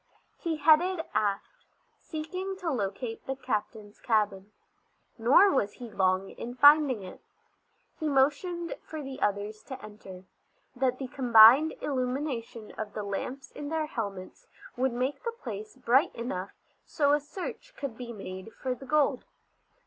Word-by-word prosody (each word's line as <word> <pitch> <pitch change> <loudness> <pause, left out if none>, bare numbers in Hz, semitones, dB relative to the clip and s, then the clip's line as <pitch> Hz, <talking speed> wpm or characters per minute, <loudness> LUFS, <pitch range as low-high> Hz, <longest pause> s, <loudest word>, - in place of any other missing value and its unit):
He 330 -3 -2
headed 325 +3 +4
aft, 200 -2 -2 0.3
seeking 365 +5 -5
to 360 -4 -3
locate 225 0 -4
the 270 - -2
captain's 215 -4 -4
cabin. 205 -3 0 0.7
Nor 275 - +6
was 205 - +1
he 240 -3 -10
long 190 -1 +1
in 245 +1 -7
finding 285 -4 +6
it. 185 - -10 0.8
He 310 -2 -1
motioned 300 +6 +1
for 310 -2 -7
the 270 -1 -8
others 205 +1 -1
to 265 -2 -7
enter, 200 -5 -11 0.5
that 255 0 +1
the 265 - -5
combined 250 +4 +7
illumination 250 -4 -3
of 210 -1 -4
the 210 - -4
lamps 245 +7 -5
in 290 -1 -7
their 320 -1 -1
helmets 200 -9 -6 0.3
would 260 +1 +1
make 255 +4 -2
the 465 - -1
place 215 - -7
bright 260 +6 +2
enough 200 -5 -4 0.3
so 285 -2 +2
a 295 - +4
search 370 - -8
could 275 -6 -5
be 240 0 -7
made 190 -1 -8
for 260 -1 -2
the 265 +2 -11
gold. 285 -3 +2
255 Hz, 145 wpm, -29 LUFS, 215-295 Hz, 0.8 s, combined